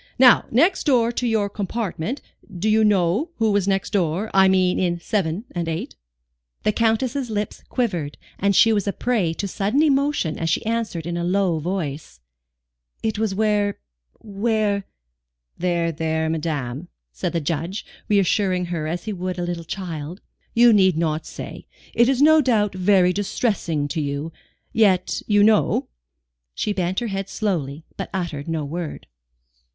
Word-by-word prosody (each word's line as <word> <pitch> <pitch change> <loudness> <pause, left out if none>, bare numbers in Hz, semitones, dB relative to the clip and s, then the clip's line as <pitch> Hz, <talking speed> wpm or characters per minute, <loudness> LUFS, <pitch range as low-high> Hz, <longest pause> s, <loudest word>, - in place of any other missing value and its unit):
Now 250 -1 +6
next 335 - +3
door 240 -5 +3
to 245 0 -2
your 220 -3 +1
compartment 210 - -3 0.4
do 195 +5 -1
you 220 0 +4
know 205 - +2
who 225 -2 +1
was 200 -1 +1
next 195 -1 0
door? 185 +2 0
I 190 0 +6
mean 185 -1 +3
in 175 -2 0
7 185 +2 -1
and 170 -2 -3
8?" 165 0 -4 0.7
The 215 - +3
Countess's 235 +4 0
lip 210 -1 -2 0.2
quivered, 175 - -2 0.2
and 200 0 +2
she 225 +4 +6
was 205 -2 0
a 200 - 0
prey 220 -9 0
to 200 - -3
sudden 205 - +1
emotion 280 - +1
as 165 - -1
she 165 - 0
answered 225 -8 -2
in 170 0 -3
a 170 - -2
low 180 -2 +1
voice: 155 -4 -4 0.8
"It 220 -1 -1
was 215 -3 0
where 210 -1 +1 0.4
where 205 -1 -1 0.4
" - - -54
"There, 170 -1 0
there, 160 0 -1
madame," 150 -2 -3 0.2
said - - -3
the 170 - +1
Judge, 165 +5 -3 0.2
reassuring 195 -2 +2
her 155 -2 -2
as 170 +2 -3
he 215 - -4
would 185 -1 -4
a 175 - -2
little 175 -1 -3
child. 170 -1 -6 0.4
"You 235 0 +7
need 190 -5 +4
not 160 -1 -1
say. - - -8 0.3
It 235 +2 +4
is 270 +1 +3
no 315 +1 +7
doubt 215 -7 +2
very 185 -1 +3
distressing 190 -7 -1
to 160 - -2
you. 145 +2 -3 0.4
Yet, 190 -5 +2
you 205 -1 +4
know?" 215 0 +3 0.7
She 210 - -1
bent 185 +2 -1
her - - -2
head 195 0 -4
slowly, 160 -8 -2
but - - -4
uttered 170 -6 -4
no 160 -2 -2
word. 165 +2 -5
190 Hz, 165 wpm, -22 LUFS, 165-215 Hz, 0.8 s, You